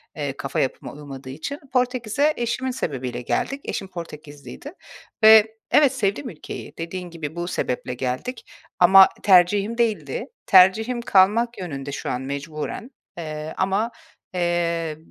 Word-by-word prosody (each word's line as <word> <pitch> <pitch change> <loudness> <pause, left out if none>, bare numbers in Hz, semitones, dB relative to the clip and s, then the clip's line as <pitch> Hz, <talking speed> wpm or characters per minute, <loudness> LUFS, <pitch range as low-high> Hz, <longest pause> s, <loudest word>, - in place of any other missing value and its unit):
eee, 140 -3 -4
kafa 140 -1 -3
yapıma 130 - -2
uymadığı 140 -2 -10
için. 155 - -6
Portekiz'e 250 +3 +1
eşimin 240 +2 -2
sebebiyle 130 - -4
geldik. 275 - -2
Eşim 195 - -4
Portekizliydi 155 - -10 0.5
ve 220 0 +7 0.2
evet, 285 -3 +5
sevdim 245 +2 -1
ülkeyi. 155 -7 -9
Dediğin 175 +2 -6
gibi 160 -2 -7
bu 175 0 -3
sebeple 125 -6 -3
geldik 130 - -4 0.3
ama 190 +2 +8
tercihim 200 +4 +4
değildi. 230 -3 -1 0.2
Tercihim, 220 +6 +5
kalmak 230 +3 +3
yönünde 140 -6 -6
şu - - -5
an 125 - -2
mecburen. 150 - -5 0.3
Eee, 155 -1 -6
ama, 195 +5 0 0.4
eee, 170 -3 -1
180 Hz, 125 wpm, -23 LUFS, 150-225 Hz, 0.5 s, ama